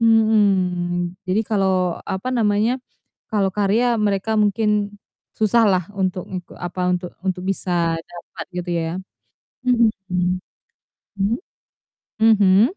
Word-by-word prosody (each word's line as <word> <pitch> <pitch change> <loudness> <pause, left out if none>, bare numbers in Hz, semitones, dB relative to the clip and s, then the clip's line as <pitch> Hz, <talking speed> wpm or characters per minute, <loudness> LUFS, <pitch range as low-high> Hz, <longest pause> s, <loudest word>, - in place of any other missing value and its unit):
Mhm. 190 -6 +2
Jadi 185 +4 +2
kalau 190 -4 +1
apa 190 +7 -3
namanya, 225 +1 +2 0.5
kalau 200 -3 +1
karya 205 +4 +2 0.2
mereka 205 0 0
mungkin 210 0 +1 0.4
susah 220 +2 +4
lah 185 -1 +2 0.2
untuk 185 -1 0
untuk 180 -2 -7
apa, 175 +1 -4 0.4
untuk 185 -1 -1
bisa 175 -3 0
dapat 175 -1 -9
gitu 175 0 -3
ya? 165 0 -2 0.8
Mhm. 235 -2 +5 0.2
Mmm? 180 0 -2 1.7
Mhm? 205 -3 +6
195 Hz, 105 wpm, -21 LUFS, 180-215 Hz, 1.7 s, Mhm